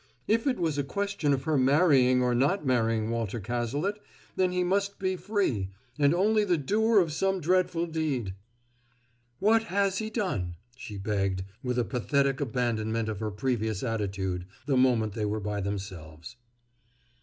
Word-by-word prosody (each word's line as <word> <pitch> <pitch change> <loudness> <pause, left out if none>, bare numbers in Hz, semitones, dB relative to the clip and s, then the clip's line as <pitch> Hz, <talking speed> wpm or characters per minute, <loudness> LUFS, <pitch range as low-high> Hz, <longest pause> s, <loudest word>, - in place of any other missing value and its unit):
If 225 +4 +2
it 260 - +1
was 160 -5 0
a - - +1
question 200 -1 -1
of 135 -1 0
her 150 -1 +1
marrying 130 -3 +4
or 125 -1 +2
not 145 +9 +1
marrying 115 -3 +1
Walter 115 -1 -2
Cazalet, 120 - -2 0.4
then 185 -1 +2
he 180 0 +1
must 200 +2 0
be 190 -1 -1
free, 180 - -1 0.3
and 145 -1 +5
only 210 +5 +3
the 180 -4 +2
doer 215 +10 +2
of 165 -5 +1
some 190 +3 0
dreadful 175 0 +1
deed! 150 - -2 1.0
"What 225 +2 +3
has 195 -2 +1
he 220 0 -3
done?" 180 - -2 0.2
she 110 -5 -8
begged, 95 -2 -1 0.2
with 125 -1 -2
a 120 - +2
pathetic 140 +1 0
abandonment 115 -3 -1
of 105 -3 -4
her 110 - -2
previous 110 -1 -2
attitude, 95 -6 -2 0.2
the 140 -1 +1
moment 120 -5 +3
they 110 -1 -2
were 105 +1 -1
by 105 0 -3
themselves. 95 -1 -6
130 Hz, 160 wpm, -28 LUFS, 110-185 Hz, 1.0 s, and